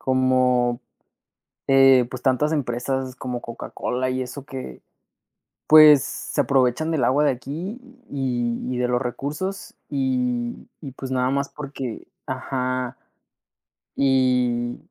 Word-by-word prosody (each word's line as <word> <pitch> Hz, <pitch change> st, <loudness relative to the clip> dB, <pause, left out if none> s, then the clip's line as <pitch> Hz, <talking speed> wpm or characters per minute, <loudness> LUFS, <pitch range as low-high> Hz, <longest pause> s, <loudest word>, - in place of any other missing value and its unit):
como, 125 Hz, -1 st, +2 dB, 0.9 s
eh, 135 Hz, -2 st, +6 dB
pues, 130 Hz, -1 st, -7 dB
tantas 135 Hz, +3 st, +2 dB
empresas, 130 Hz, -2 st, -2 dB
como 125 Hz, -2 st, -5 dB
Coca-Cola 125 Hz, +2 st, -4 dB
y 130 Hz, 0 st, -1 dB
eso 130 Hz, +2 st, -7 dB
que, 130 Hz, -2 st, -8 dB, 0.9 s
pues, 155 Hz, -3 st, +8 dB
se -, -, -3 dB
aprovechan 135 Hz, +3 st, +1 dB
del 155 Hz, -5 st, +1 dB
agua 145 Hz, +3 st, +3 dB
de 145 Hz, -, +4 dB
aquí, 160 Hz, -, -5 dB, 0.3 s
y 120 Hz, -4 st, -1 dB
y -, -, -3 dB
de 125 Hz, 0 st, 0 dB
los 125 Hz, 0 st, +1 dB
recursos, 150 Hz, +10 st, -4 dB, 0.2 s
y 125 Hz, -3 st, -1 dB
y 140 Hz, -4 st, -8 dB
pues 130 Hz, 0 st, -7 dB
nada 130 Hz, 0 st, +1 dB
más 140 Hz, +1 st, -1 dB
porque 135 Hz, -5 st, -7 dB, 0.2 s
ajá, 130 Hz, -1 st, -3 dB, 1.0 s
y, 125 Hz, -3 st, +2 dB
130 Hz, 120 wpm, -23 LUFS, 125-140 Hz, 1.0 s, pues